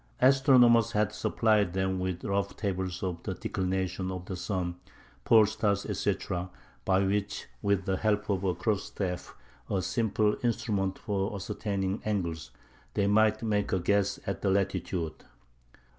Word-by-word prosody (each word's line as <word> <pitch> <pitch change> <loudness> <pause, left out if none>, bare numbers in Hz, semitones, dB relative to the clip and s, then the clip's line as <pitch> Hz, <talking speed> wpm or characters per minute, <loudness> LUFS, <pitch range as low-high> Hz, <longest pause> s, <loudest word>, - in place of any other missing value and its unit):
Astronomers 125 -4 +5
had 105 0 +1
supplied 105 -3 +2
them 95 0 0
with 90 -1 -3
rough 100 0 -1
tables 95 -3 -2
of 90 -3 -3
the - - -4
declination 95 0 -2
of 90 -1 -5
the 95 - -5
sun, 90 -1 -3 0.5
pole 110 -2 +7
star, 110 -1 +1
etc., 95 -2 -2 0.4
by 95 0 +3
which, 105 +1 -1 0.2
with 100 -2 +1
the 95 -1 0
help 105 0 0
of 100 -2 0
a 90 -2 +1
cross 105 +2 -1
staff,—a 90 -4 -5
simple 105 +1 +1
instrument 100 -5 0
for 100 0 -2
ascertaining 100 0 -2
angles,—they 95 0 -4
might 110 +2 +3
make 105 -2 0
a 95 - +2
guess 100 +2 +1
at 100 - -3
the 100 - +1
latitude. 90 -4 -1
100 Hz, 140 wpm, -29 LUFS, 95-105 Hz, 0.5 s, pole